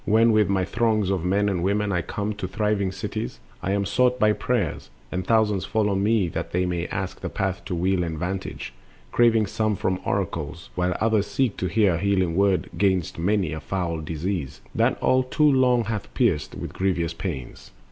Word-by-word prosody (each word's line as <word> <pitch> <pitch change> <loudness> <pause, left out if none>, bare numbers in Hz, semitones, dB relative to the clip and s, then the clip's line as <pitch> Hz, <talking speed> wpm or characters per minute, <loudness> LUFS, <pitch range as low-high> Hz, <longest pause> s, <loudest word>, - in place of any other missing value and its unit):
When 115 +2 +4
with 110 -2 +3
my 95 -2 +1
throngs 110 -4 +1
of 95 -4 -1
men 100 +3 +2
and 95 -4 0
women 100 +2 +1
I 90 -2 +1
come 105 +3 -3
To 105 -2 -5
thriving 100 0 0
cities, 95 -9 -5 0.2
I 90 - -1
am 100 0 +1
sought 125 +5 +2
by 105 0 +4
prayers, 105 - -2 0.2
And 90 0 -3
thousands 110 -4 +3
follow 105 -2 +1
me 100 0 +2
that 80 +1 -5
they 90 +1 +2
may 85 -1 -2
ask 95 -1 -4
The - - -3
path 95 -2 -2
to 90 - -3
weal 90 +1 +1
and 80 -2 -3
vantage, 90 -6 -4 0.4
craving 115 -2 +4
some 110 +1 0
For 95 -1 -1
oracles, 85 -5 -3
whilst 90 0 0
others 110 -2 +2
seek 120 +1 0
to 95 - -1
hear 100 0 +3
A - - 0
healing 95 -4 +1
word 100 -1 +2
'gainst 95 -5 +1
many 95 -2 +1
a 80 - -4
foul 85 0 -2
disease 80 -1 -4
That - - +1
all 130 - +4
too 145 +4 +3
long 125 -3 +4
hath 110 -1 -4
pierced 95 - +1
with - - -6
grievous 85 -3 0
pains. 75 -11 -6
95 Hz, 195 wpm, -24 LUFS, 90-105 Hz, 0.4 s, When